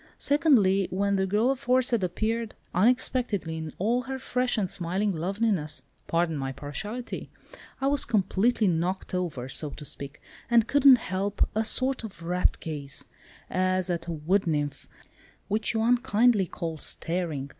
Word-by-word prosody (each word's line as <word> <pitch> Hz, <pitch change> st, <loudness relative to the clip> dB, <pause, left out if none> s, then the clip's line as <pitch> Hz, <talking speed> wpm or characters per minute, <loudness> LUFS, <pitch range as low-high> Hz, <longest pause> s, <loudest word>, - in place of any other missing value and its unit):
Secondly, 210 Hz, -, +3 dB
when 200 Hz, +1 st, 0 dB
the 190 Hz, 0 st, +1 dB
girl 215 Hz, +7 st, +2 dB
aforesaid 255 Hz, -4 st, +1 dB
appeared, 220 Hz, +5 st, -2 dB, 0.2 s
unexpectedly 230 Hz, -4 st, +1 dB
in 160 Hz, -1 st, -5 dB
all 230 Hz, +6 st, +1 dB
her 265 Hz, +1 st, -5 dB
fresh 250 Hz, -1 st, -1 dB
and 200 Hz, -3 st, +1 dB
smiling 190 Hz, +3 st, -1 dB
loveliness—pardon 170 Hz, -, -1 dB
my 135 Hz, -2 st, -3 dB
partiality—I 210 Hz, -, -7 dB
was 280 Hz, 0 st, +3 dB
completely 215 Hz, +1 st, +2 dB
knocked 180 Hz, +3 st, -1 dB
over, 165 Hz, -9 st, -2 dB
so 150 Hz, +3 st, -1 dB
to 150 Hz, -, -9 dB
speak, 140 Hz, 0 st, -7 dB, 0.3 s
and 235 Hz, -2 st, +4 dB
couldn't 280 Hz, -2 st, +7 dB
help 195 Hz, -1 st, -1 dB
a 220 Hz, -, +1 dB
sort 255 Hz, +3 st, 0 dB
of 195 Hz, -6 st, -9 dB
rapt 180 Hz, +2 st, 0 dB
gaze—as 180 Hz, +5 st, -2 dB
at 170 Hz, -1 st, -3 dB
a -, -, -3 dB
wood 170 Hz, +5 st, 0 dB
nymph, 145 Hz, -3 st, -1 dB, 0.6 s
which 215 Hz, +2 st, 0 dB
you 220 Hz, -, +1 dB
unkindly 240 Hz, -4 st, +3 dB
call 165 Hz, -1 st, -5 dB
staring. 165 Hz, -4 st, -2 dB
195 Hz, 135 wpm, -27 LUFS, 165-235 Hz, 0.6 s, couldn't